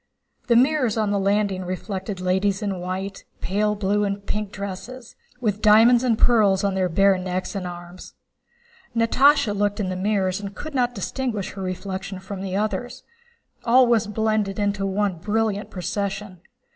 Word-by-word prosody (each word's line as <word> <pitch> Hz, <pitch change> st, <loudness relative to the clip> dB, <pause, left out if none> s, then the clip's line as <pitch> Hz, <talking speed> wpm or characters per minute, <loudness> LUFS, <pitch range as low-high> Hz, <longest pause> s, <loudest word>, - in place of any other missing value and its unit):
The 235 Hz, -, +4 dB
mirrors 255 Hz, -2 st, +3 dB
on 215 Hz, -2 st, +1 dB
the 200 Hz, -, +1 dB
landing 200 Hz, -1 st, +1 dB
reflected 190 Hz, +1 st, -5 dB
ladies 190 Hz, +2 st, 0 dB
in 195 Hz, -3 st, -2 dB
white, 190 Hz, +2 st, -5 dB, 0.2 s
pale 210 Hz, +2 st, 0 dB
blue, 205 Hz, 0 st, 0 dB
and 200 Hz, 0 st, -3 dB
pink 210 Hz, 0 st, -3 dB
dresses, 200 Hz, +6 st, -7 dB, 0.2 s
with 210 Hz, -4 st, -1 dB
diamonds 225 Hz, +3 st, +6 dB
and 235 Hz, -3 st, +2 dB
pearls 210 Hz, -6 st, +4 dB
on 200 Hz, -1 st, +1 dB
their 185 Hz, -1 st, 0 dB
bare 195 Hz, +2 st, +3 dB
necks 185 Hz, +2 st, -3 dB
and 190 Hz, -3 st, -4 dB
arms. 175 Hz, +1 st, -10 dB, 0.8 s
Natásha 230 Hz, 0 st, +4 dB
looked 205 Hz, +1 st, 0 dB
in 195 Hz, -3 st, -1 dB
the 185 Hz, -, -2 dB
mirrors 190 Hz, -1 st, 0 dB
and 200 Hz, 0 st, -7 dB
could 310 Hz, 0 st, -7 dB
not 245 Hz, -2 st, 0 dB
distinguish 220 Hz, 0 st, -3 dB
her 195 Hz, -, -8 dB
reflection 190 Hz, +1 st, -4 dB
from 190 Hz, 0 st, -7 dB
the 190 Hz, -1 st, -3 dB
others. 215 Hz, +4 st, -2 dB, 0.6 s
All 250 Hz, +2 st, +5 dB
was 230 Hz, -3 st, +2 dB
blended 215 Hz, -2 st, 0 dB
into 200 Hz, -1 st, 0 dB
one 195 Hz, -1 st, 0 dB
brilliant 215 Hz, +1 st, -1 dB
procession. 195 Hz, 0 st, -4 dB
200 Hz, 160 wpm, -23 LUFS, 190-220 Hz, 0.8 s, diamonds